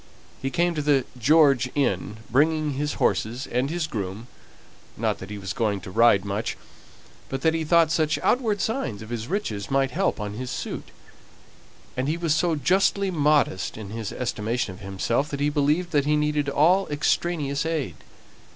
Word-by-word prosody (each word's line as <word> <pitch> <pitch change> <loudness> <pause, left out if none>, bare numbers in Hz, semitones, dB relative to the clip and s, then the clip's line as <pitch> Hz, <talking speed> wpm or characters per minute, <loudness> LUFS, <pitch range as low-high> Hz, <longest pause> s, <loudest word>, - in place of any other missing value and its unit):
He 135 - -1
came 170 +6 +1
to 155 - -2
the 145 -3 +2
George 135 0 +4
Inn, 125 -6 0
bringing 150 +4 +2
his 145 +2 -2
horses 120 +6 0
and 125 +3 -1
his 170 0 -1
groom; 105 -4 -5 0.7
not - - -1
that 95 - -8
he 105 - -6
was 95 -1 -5
going 105 -4 0
to 95 - -9
ride 110 -2 +4
much, 100 +3 -3 0.7
but 135 0 -3
that 160 +2 +3
he 165 0 -1
thought 165 0 +4
such 155 -1 +1
outward 220 -5 +1
signs 170 - -2
of 110 - -11
his 115 -1 -4
riches 115 - -3
might 135 -1 +1
help 190 0 0
on 105 -1 -4
his 125 +4 -5
suit; - - -5 1.1
and 130 +2 -1
he 155 +3 0
was 170 -3 +1
so 165 +1 +1
justly 190 +6 +2
modest 150 - +1
in 105 -3 -8
his 110 -2 -4
estimation 115 -3 -2
of 90 - -13
himself 105 +8 -1
that 140 - -4
he 145 +1 +2
believed 150 +4 +1
that 145 -2 +2
he 150 +1 +3
needed 150 -1 0
all 175 +7 +3
extraneous 150 -1 0
aid. 155 - -2
140 Hz, 180 wpm, -25 LUFS, 115-160 Hz, 1.1 s, George